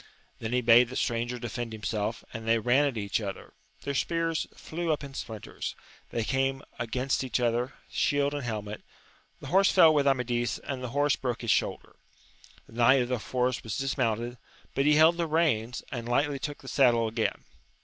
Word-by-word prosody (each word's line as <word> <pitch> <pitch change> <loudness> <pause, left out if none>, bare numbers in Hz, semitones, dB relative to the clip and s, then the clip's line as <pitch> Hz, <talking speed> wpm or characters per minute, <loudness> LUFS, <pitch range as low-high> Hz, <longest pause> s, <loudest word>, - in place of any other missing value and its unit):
Then 110 0 -4
he 125 0 +2
bade 120 +1 +6
the 130 - -7
stranger 120 +1 -1
defend 120 -1 -5
himself, 110 0 -3
and 115 0 -6
they 115 0 +4
ran 125 +6 +3
at 135 -5 -1
each 100 +1 -1
other: 100 -2 -6 0.3
their 140 - -2
spears 165 +3 0
flew 165 0 -3
up 150 - -1
in 140 -1 -8
splinters; 110 -5 -6 0.3
they 115 - -2
came 135 +3 0 0.2
against 125 +4 -1
each 130 -1 -1
other, 120 +2 0
shield 145 0 +1
and 145 - -3
helmet; 105 -4 -5 0.6
the - - -8
horse 195 +4 +4
fell 165 -4 +7
with 145 -2 +2
Amadis, 120 -3 +1
and 135 -2 -6
the 125 - -3
horse 145 -1 +3
broke 125 -3 -3
his 115 - +1
shoul - - +1
der; - - -23 0.7
the - - -18
knight 125 +3 +5
of 120 - -6
the 125 -2 0
forest 125 +2 -1
was 110 -2 -4
dismounted, 120 -3 -1 0.3
but 135 +2 +1
he 150 - +6
held 160 +2 +6
the 170 -1 0
reins, 130 -7 +1
and 120 -2 -5
lightly 140 +3 +1
took 145 +1 -6
the - - -11
saddle 120 -4 +3
again. 110 0 -2
125 Hz, 190 wpm, -28 LUFS, 115-140 Hz, 0.7 s, fell